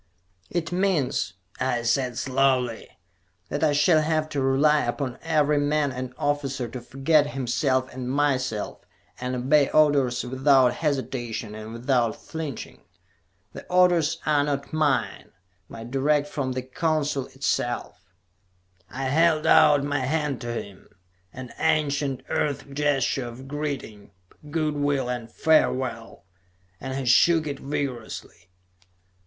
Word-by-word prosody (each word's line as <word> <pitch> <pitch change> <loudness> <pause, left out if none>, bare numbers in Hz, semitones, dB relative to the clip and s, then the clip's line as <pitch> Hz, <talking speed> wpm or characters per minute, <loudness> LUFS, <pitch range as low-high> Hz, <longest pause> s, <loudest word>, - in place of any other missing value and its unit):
"It 170 -1 -3
means," 175 - 0 0.3
I 125 -2 0
said 125 +1 0
slowly, 130 -3 +1 0.6
"that 145 +2 -2
I 150 -2 +3
shall 155 +2 +4
have 155 0 0
to 145 -2 -2
rely 145 +3 +3
upon 125 +1 -3
every 150 -2 +2
man 145 0 +1
and 130 0 -5
officer 140 -3 -1
to 125 +2 -7
forget 140 +4 +2
himself 130 -1 0
and 125 -1 -5
myself, 130 -6 -1 0.4
and 125 +1 -3
obey 140 +3 +3
orders 140 -5 +3
without 130 0 +3
hesitation 120 -7 -3
and 110 +1 -8
without 120 -1 +1
flinching. 160 -6 -7 0.7
The - - -8
orders 175 -3 +3
are 150 -2 +3
not 140 0 -3
mine, 135 -10 0 0.4
but 115 +1 -9
direct 145 +2 +2
from 135 -3 -3
the 130 0 -3
Council 150 -1 -1
itself." 120 -7 -3 0.7
I 135 +3 -5
held 155 +3 +2
out 145 -2 +6
my 145 0 -1
hand 140 -1 -1
to 120 -1 -4
him 100 -4 -8 0.4
an 130 -1 -9
ancient 145 -4 0
Earth 145 -1 -1
gesture 140 -3 0
of 125 +3 -10
greeting, 140 -8 -5 0.4
good 155 -1 0
will 145 -3 0
and 120 -2 -5
farewell 130 - 0 0.5
and 130 +1 -5
he 135 - -3
shook 160 +6 +4
it 140 -2 -4
vigorously. 125 -10 -5
135 Hz, 125 wpm, -25 LUFS, 125-150 Hz, 0.7 s, out